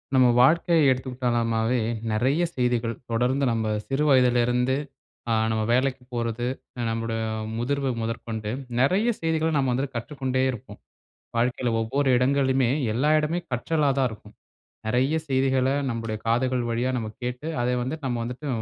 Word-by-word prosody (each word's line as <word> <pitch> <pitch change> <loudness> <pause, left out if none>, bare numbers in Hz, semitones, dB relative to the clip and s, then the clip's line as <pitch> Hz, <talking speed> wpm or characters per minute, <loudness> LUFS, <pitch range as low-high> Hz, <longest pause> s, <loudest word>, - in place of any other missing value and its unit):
நம்ம 130 -1 +6
வாழ்க்கைய 160 +2 +4
எடுத்துகிட்டனாமே, 120 -2 0 0.3
நிறைய 130 +10 +1
செய்திகள் 120 -2 0 0.2
தொடர்ந்து 125 +4 +1
நம்ம 110 -2 0 0.2
சிறு 135 +2 0
வயதில 125 -3 +4
இருந்து 125 +2 +1 0.6
அ - - +3 0.2
நம்ம 110 -1 0
வேலைக்கு 130 +1 +1
போறது, 115 0 -2 0.3
அ - - -3
நம்மோட 115 0 -2 0.4
முதிர்வு 135 +3 -1
முதற்கொண்டு 115 -1 -4 0.3
நிறைய 185 - +3
செய்திகள 160 -1 +1
நம்ம 135 -2 +1
வந்து 135 +3 0
கற்றுக்கொண்டே 130 +2 -2
இருப்போம். 120 -5 -10 0.6
வாழ்க்கையில 120 0 0
ஒவ்வொரு 135 +5 0
இடங்களுமே 130 -1 +2 0.2
எல்லா 135 +7 +1
இடமே 155 +3 -1
கற்றலா 145 +4 +1
தான் 130 -2 +3
இருக்கும். 105 -1 -12 0.5
நிறைய 130 +7 +2
செய்திகள 130 -1 +2 0.2
நம்முடைய 115 -2 -3
காதுகள் 125 +2 +1
வழியா 120 +2 0
நம்ம 110 -2 -3 0.2
கேட்டு, 125 +5 -4 0.2
அதை 125 +1 +1
வந்து 130 +6 -3
நம்ம 125 -2 -1
வந்துட்டு 125 +5 -6
125 Hz, 140 wpm, -25 LUFS, 115-135 Hz, 0.6 s, நம்ம